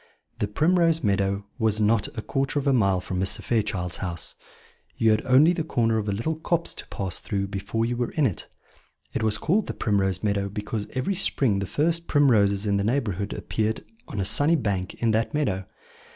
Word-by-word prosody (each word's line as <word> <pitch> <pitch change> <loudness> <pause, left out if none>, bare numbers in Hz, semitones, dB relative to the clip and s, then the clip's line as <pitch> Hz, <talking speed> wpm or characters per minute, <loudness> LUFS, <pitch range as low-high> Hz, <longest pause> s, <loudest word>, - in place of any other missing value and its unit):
The 105 - 0
Primrose 165 - +2
Meadow 100 -1 0
was 110 -2 +1
not 105 0 +3
a 110 - -3
quarter 135 +1 -1
of 145 - -1
a 140 - +3
mile 100 -6 +2
from 90 0 -4
Mr. 95 +1 0
Fairchild's 100 -6 -1
house: 90 -3 -4 0.6
you 110 -1 +4
had 110 0 +2
only 140 +7 +6
the 165 - -2
corner 115 -7 +1
of 105 -1 -3
a - - +1
little 135 +11 -2
copse 170 +1 -1
to - - -8
pass 95 -3 -2
through 100 -1 -3
before 100 +3 -2
you 120 +1 -1
were 120 -1 -1
in 155 - +1
it. 100 - -2 0.7
It - - -1
was 110 -1 +1
called 195 +6 +1
the - - -4
Primrose 95 -3 0
Meadow 100 -1 0
because 105 +1 -4
every 130 +9 -1
spring 135 - +1
the 100 - -3
first 165 - 0
primroses 105 -8 +3
in 100 -1 +2
the 100 - 0
neighbourhood 105 -4 -1
appeared 110 0 -2 0.2
on 105 - -5
a 95 - 0
sunny 145 - +3
bank 100 - -2
in 115 -1 +1
that 110 +6 0
meadow. 95 -11 -1
110 Hz, 200 wpm, -25 LUFS, 100-140 Hz, 0.7 s, only